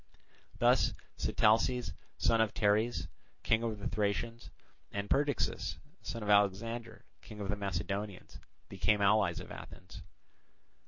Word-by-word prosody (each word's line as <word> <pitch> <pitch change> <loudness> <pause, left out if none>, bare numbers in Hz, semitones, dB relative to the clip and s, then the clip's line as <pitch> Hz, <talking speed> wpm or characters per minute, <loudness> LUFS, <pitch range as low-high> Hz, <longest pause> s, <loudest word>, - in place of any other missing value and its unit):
Thus - - +4 0.2
Sitalces, 115 -2 +2 0.2
son 115 -1 +3
of 110 -2 0
Teres, 105 -4 +2 0.4
King 110 0 +3
of 115 -2 -2
the 100 - -3
Thracians, 110 +2 -2 0.4
and 100 0 -3
Perdiccas, 145 0 +1 0.2
son 115 -2 -5
of 105 - -4
Alexander, 115 +4 +1 0.2
King 105 -2 -11
of 100 -1 -4
the 105 - +1
Macedonians, 100 0 -4 0.3
became 105 -1 +1
allies 100 -3 +3
of - - -9
Athens. - - -10
105 Hz, 120 wpm, -33 LUFS, 100-115 Hz, 0.4 s, Thus